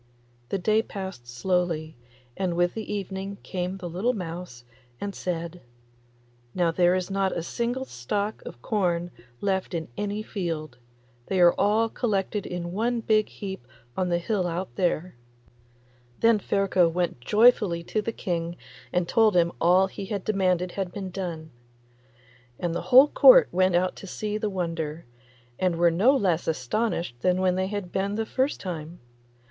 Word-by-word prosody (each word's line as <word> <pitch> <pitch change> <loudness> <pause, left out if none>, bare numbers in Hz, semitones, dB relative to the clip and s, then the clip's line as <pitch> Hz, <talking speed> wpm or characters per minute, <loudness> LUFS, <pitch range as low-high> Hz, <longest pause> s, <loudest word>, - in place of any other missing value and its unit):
The - - 0
day 215 +4 +2
passed 190 - -7
slowly, 160 +4 -1 0.4
and 185 -3 -1
with 175 0 +2
the 220 -1 -5
evening 195 0 -4
came 185 0 -3
the 180 -2 -6
little 190 +9 0
mouse 170 - -6 0.4
and 200 -1 -4
said, 170 -1 -4 0.9
'Now 175 -2 +2
there 175 +1 +3
is 185 +1 -2
not 195 -1 0
a 165 - -2
single 240 +7 -2
stalk 200 - -3
of 120 - -10
corn 175 -4 0 0.3
left 190 -2 -1
in 160 -3 -4
any 205 +1 -2
field; 160 - -4 0.5
they 190 - 0
are 175 -1 +7
all 215 +3 +2
collected 210 -3 -1
in 175 -1 -4
one 230 +5 0
big 215 -1 +2
heap 190 -12 -7 0.3
on 185 -1 0
the 175 - +2
hill 185 +1 -1
out 175 +2 -4
there.' 180 -1 0 1.1
Then 230 -1 +5
Ferko 195 -3 +2
went 175 -5 -1
joyfully 210 - +4
to 215 +5 -1
the 230 - -3
King 170 -4 -3 0.3
and 180 -1 0
told 220 -1 +4
him 170 -1 +4
that - - -14
all 180 +3 +5
he 195 0 -7
demanded 185 -3 0
had 190 -2 -3
been 190 -1 -6
done. 170 -4 -5 1.1
And 175 -2 -1
the 170 - -2
whole 265 +4 +8
Court - - +7
went 185 0 +3
out 185 +1 +1
to 195 - -9
see 210 +3 -3
the 215 - -1
wonder, 165 -4 -3 0.5
and 180 -2 +1
were 170 0 +4
no 230 +12 +4
less 180 -7 0
astonished 160 - -1
than 180 +4 +2 0.2
they 185 +1 0
had 200 -3 -4
been 200 +1 -1
the 220 +1 -1
first 265 +5 0
time. 170 -2 -6
185 Hz, 160 wpm, -26 LUFS, 170-205 Hz, 1.1 s, whole